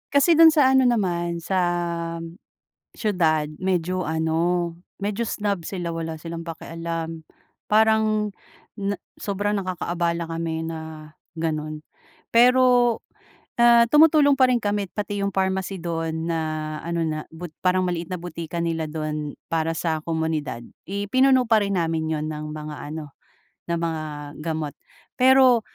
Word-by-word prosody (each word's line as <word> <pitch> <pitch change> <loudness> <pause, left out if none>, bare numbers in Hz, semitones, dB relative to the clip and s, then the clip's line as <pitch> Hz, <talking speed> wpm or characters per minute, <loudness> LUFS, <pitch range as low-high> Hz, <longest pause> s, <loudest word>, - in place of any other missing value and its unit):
kasi 325 +4 +5
dun 325 0 +9
sa 290 -4 +4
ano 265 0 +5
naman 175 -7 0
sa 190 +1 0 1.4
siyudad 165 -8 +1
medyo 185 -1 0
ano 165 +2 0 0.2
medyo 205 +3 -1
snob 200 -5 -2
sila 175 -3 -3
wala 165 -1 -4
silang 165 +1 -6
pakialam. 165 0 -5 0.4
Parang 215 -1 +3 0.5
na 200 0 -1 0.2
sobrang 205 +1 -1
nakakaabala 175 -3 -1
kami 165 -1 -3
na 160 -1 -7 0.2
ganun. 155 -2 -3 0.5
Pero 245 -1 +5 0.6
na 235 0 +7
tumutulong 300 +2 +6
pa 260 -2 +4
rin 250 - +3
kami 205 -3 -1
pati 205 0 -3
yung 200 - +1
pharmacy 190 0 -1
dun 165 -2 -3
na 165 -1 -1 0.4
ano 170 0 -1
na 155 -1 -2
bot 160 0 -9
parang 185 0 +2
maliit 175 -2 -3
na 185 - -3
butika 170 -1 -6
nila 165 -2 -1
dun 150 -1 -4 0.2
para 165 0 0
sa 160 -1 -1
komunidad 160 -7 -2 0.2
ipinuno 255 +6 +3
pa 225 -2 +4
rin 200 -1 0
namin 165 -2 0
yun 155 -1 -1
ng 155 0 -5
mga 150 0 -6
ano 150 -2 -7 0.6
ng 170 - +1
mga 165 -2 -2 0.4
gamot. 155 -2 -3 0.5
Pero, 260 -2 +6
170 Hz, 135 wpm, -24 LUFS, 160-210 Hz, 1.4 s, dun